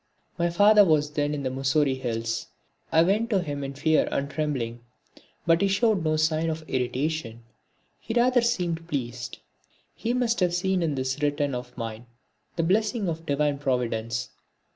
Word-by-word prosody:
My 170 0 +2
father 205 +4 +6
was 150 -4 +2
then 150 0 0
in 140 - -4
the 130 - -1
Mussoorie 135 +1 +1
hills. 115 -2 -2 0.4
I 160 0 +5
went 210 +6 +1
to 205 -4 +2
him 145 -3 -4
in 135 0 -5
fear 155 +2 +2
and 140 - -1
trembling. 130 -7 -2 0.7
But 165 0 +4
he 200 - +4
showed 200 -1 +2
no 155 -1 +1
sign 155 +1 +1
of 160 0 -5
irritation, 130 -1 -2 0.6
he 225 - -5
rather 245 +1 +4
seemed 175 -8 -1
pleased. 125 -4 -4 0.6
He 235 +2 -2
must 240 -2 +1
have 180 -2 +2
seen 190 0 +1
in 160 -4 0
this 130 +2 -2
return 145 -1 0
of 125 0 -6
mine 115 0 -6 0.5
the 165 - 0
blessing 210 +4 +1
of 165 -1 -4
Divine 145 0 +1
Providence. 115 -4 -1
155 Hz, 165 wpm, -26 LUFS, 130-180 Hz, 0.7 s, father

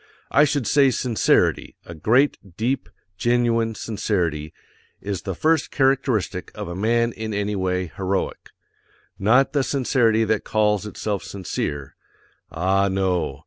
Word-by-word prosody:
I 150 - +5
should 145 -2 0
say_ 135 +2 +4
SINCERITY, 120 -2 +1
a 85 - -9
GREAT, 120 - +3 0.2
DEEP, 125 +5 -1 0.3
GENUINE 115 -2 +1
SINCERITY, 85 -9 -2 0.5
is 100 -2 -4
the 95 -3 -4
first 160 - +1
CHARACTERISTIC 125 -8 0
of - - -5
a 85 - -5
man 115 +4 +1
in 110 -1 -5
any 105 0 -1
way 90 -1 -1
HEROIC. 95 0 -3 0.7
Not 120 +7 +3
the 145 - +2
sincerity 125 -5 +2
that 110 -1 0
CALLS 105 -1 +1
_itself 105 -1 -3
sincere. 75 -7 -5 0.5
Ah 95 +4 +1
no. 95 -2 -1
110 Hz, 130 wpm, -22 LUFS, 95-120 Hz, 0.7 s, I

